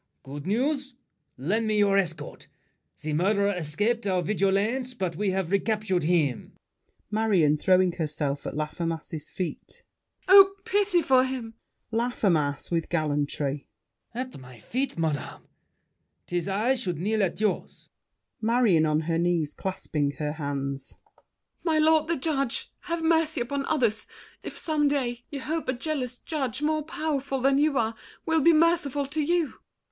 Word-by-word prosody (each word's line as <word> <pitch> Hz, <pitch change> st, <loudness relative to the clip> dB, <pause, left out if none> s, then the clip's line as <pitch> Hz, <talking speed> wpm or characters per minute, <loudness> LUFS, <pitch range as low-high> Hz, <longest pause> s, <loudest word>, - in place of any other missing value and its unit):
Good 145 Hz, +3 st, -8 dB
news! 270 Hz, +5 st, 0 dB, 0.4 s
Lend 210 Hz, -, 0 dB
me 215 Hz, -1 st, +1 dB
your 200 Hz, -1 st, +4 dB
escort. 165 Hz, -6 st, -2 dB, 0.6 s
The 155 Hz, 0 st, -2 dB
murderer 200 Hz, +5 st, +2 dB
escaped 205 Hz, +8 st, 0 dB
Our 185 Hz, -2 st, +1 dB
vigilance, 215 Hz, +7 st, 0 dB
but 185 Hz, -7 st, -2 dB
we've 190 Hz, -2 st, -1 dB
recaptured 200 Hz, -4 st, +1 dB
him. 155 Hz, -7 st, +1 dB, 0.6 s
MARION 200 Hz, -9 st, +3 dB
(throwing 185 Hz, +2 st, +4 dB
herself 150 Hz, -4 st, -2 dB
at -, -, -5 dB
Laffemas's 160 Hz, 0 st, -3 dB
feet). 180 Hz, -2 st, -6 dB, 0.4 s
Oh, 390 Hz, +1 st, +8 dB
pity 395 Hz, -4 st, +2 dB
for 260 Hz, -2 st, +5 dB
him! 255 Hz, -4 st, -4 dB, 0.4 s
LAFFEMAS 190 Hz, -, 0 dB
(with 165 Hz, -1 st, -1 dB
gallantry). 145 Hz, -3 st, -1 dB, 0.5 s
At 255 Hz, -, -5 dB
my 130 Hz, -1 st, -13 dB
feet, 255 Hz, -, -3 dB
madame! 155 Hz, -4 st, -2 dB, 0.8 s
'Tis 175 Hz, +1 st, -2 dB
I 210 Hz, +7 st, +2 dB
should 190 Hz, -, -3 dB
kneel 210 Hz, +6 st, 0 dB
at 190 Hz, 0 st, 0 dB
yours. 210 Hz, -2 st, -2 dB, 0.5 s
MARION 220 Hz, -8 st, +3 dB
(on 155 Hz, 0 st, +2 dB
her 165 Hz, +1 st, -1 dB
knees, 170 Hz, -3 st, +1 dB
clasping 155 Hz, -6 st, -2 dB
her 150 Hz, -1 st, -2 dB
hands). 140 Hz, -3 st, -4 dB, 0.7 s
My 320 Hz, -2 st, +2 dB
lord 310 Hz, 0 st, +4 dB
the 335 Hz, -, 0 dB
judge, 275 Hz, -3 st, -1 dB
Have 335 Hz, -2 st, -2 dB
mercy 320 Hz, -2 st, +2 dB
upon 275 Hz, +3 st, -2 dB
others, 235 Hz, -8 st, +1 dB, 0.3 s
if -, -, -8 dB
some 305 Hz, -2 st, +1 dB
day 245 Hz, -4 st, -1 dB
You 285 Hz, -4 st, -5 dB
hope 315 Hz, +4 st, -3 dB
a -, -, +2 dB
jealous 255 Hz, -2 st, -3 dB
judge, 280 Hz, -4 st, -3 dB
more 310 Hz, 0 st, +1 dB
powerful 285 Hz, -3 st, -2 dB
Than 270 Hz, +2 st, +3 dB
you 295 Hz, -2 st, +2 dB
are, 225 Hz, -1 st, +1 dB, 0.3 s
will 320 Hz, -1 st, +2 dB
be 335 Hz, -, +6 dB
merciful 315 Hz, -4 st, +2 dB
to 305 Hz, +3 st, -2 dB
you! 335 Hz, 0 st, 0 dB
215 Hz, 140 wpm, -27 LUFS, 165-275 Hz, 0.8 s, Oh